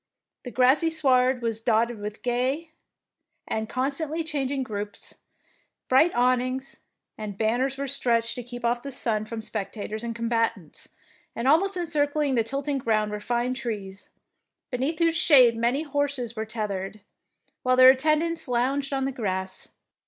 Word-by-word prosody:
The - - -4
grassy 260 +7 +3
sward 260 -5 +3
was 225 -1 -2
dotted 230 0 +1
with 210 +1 -7
gay 260 +6 -1 0.8
and 220 0 -2
constantly 290 +5 -1
changing 280 -3 -2
groups, 205 -3 -6 0.7
bright 270 +7 +5
awn 250 +1 +3
ings 260 +2 -5 0.4
and 205 -2 -5
banners 245 +5 0
were 280 - -2
stretched 235 -4 +1
to 245 - -5
keep 245 0 -7
off 240 +1 +1
the 280 - -6
sun 220 -4 -1
from 225 0 -5
spectators 215 0 -4
and 230 -1 -4
combatants, 230 -7 -2 0.5
and 235 +2 -2
almost 370 +7 +3
encircling 300 -4 0
the 235 -3 +2
tilting 275 +4 -2
ground 215 -3 +1
were 210 - -3
fine 240 +3 -1
trees, 205 -6 -6 0.6
beneath 270 +6 -1
whose 330 -1 +2
shade 255 -8 +6
many 240 +6 +1
horses 280 -5 -2
were 220 0 -4
teth 215 -2 -3
ered, 195 +2 -5 0.6
while 255 0 +2
their 255 0 +9
attendants 310 +5 0
lounged 265 +3 0
on 270 -1 0
the 270 - -1
grass. 190 -6 -4
250 Hz, 150 wpm, -26 LUFS, 225-275 Hz, 0.8 s, their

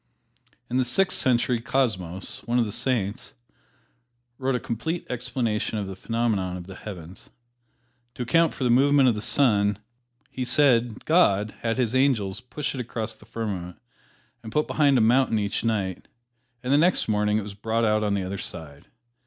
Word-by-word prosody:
In 125 - -1
the 130 - +3
Sixth 185 +10 +1
Century, 120 -1 +1
Cosmos, 105 -8 -1
one 120 +1 +1
of 120 - +3
the 105 - -4
Saints, 105 -4 -2 1.0
wrote 135 0 0
a - - 0
complete 135 +7 -3
explanation 120 -3 -2
of 105 - -2
the 95 0 -7
phenomena 105 -4 -1
of 90 - -9
the 95 - -9
heavens. 90 -3 -10 0.9
To 125 - -3
account 165 +6 +2
for - - -4
the 125 - +3
movement 135 +1 +5
of - - +2
the 105 - -4
sun, 105 -7 +2 0.5
he 130 - -3
said 125 -3 +2
God 105 - +3
had 115 0 -1
His 120 -3 0
angels 125 -7 +1
push 145 +4 -4
it 130 - -3
across 115 -1 -4
the - - -18
firmament 95 -6 -5 0.6
and 110 - -9
put 150 - +2
it - - -9
behind 140 -3 +3
a - - +4
mountain 115 +1 +3
each 100 -1 -1
night, 100 -5 -2 0.6
and 125 +2 +1
the 145 - +5
next 175 +4 +3
morning 105 -1 +1
it 110 - -1
was 100 0 -8
brought 110 +3 -1
out 110 0 +2
on 105 -1 +1
the 100 - -1
other 95 +1 -4
side. 75 -3 -8
115 Hz, 180 wpm, -25 LUFS, 100-130 Hz, 1.0 s, movement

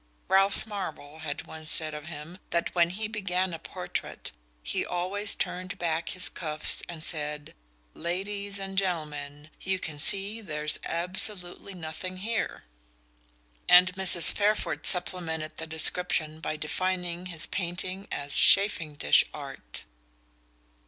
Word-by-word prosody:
Ralph 195 +2 +2
Marvell 185 -8 -7
had 155 -2 -6
once 155 -1 -3
said 155 -1 +1
of 150 0 -8
him 165 +3 -9
that 170 0 -1
when 170 -1 +3
he 210 +4 -3
began 190 -4 -2
a 165 - -6
portrait - - -6 0.3
he - - -2
always 195 +4 0
turned 185 +1 -4
back 165 -1 -2
his 180 - 0
cuffs 155 -3 0
and 165 -2 -7
said: 150 -2 -2 0.4
"Ladies 200 +4 -4
and 195 0 -1
gentlemen, 150 -5 -5
you 190 0 -1
can 155 -5 -6
see 200 +7 +3
there's 150 -6 0
absolutely 180 +2 0
nothing 180 +2 -7
here," 220 +4 -3 1.1
and 180 +1 +7
Mrs. 185 -3 +9
Fairford 210 +1 0
supplemented 160 -4 +1
the 160 - -6
description 160 -1 +2
by 155 -1 -4
defining 180 +2 -3
his 165 -3 +2
painting 185 +1 -5
as 140 0 -3
"chafing 165 -7 +3
dish" 75 - +5
art. - - -8
175 Hz, 130 wpm, -27 LUFS, 155-190 Hz, 1.1 s, Mrs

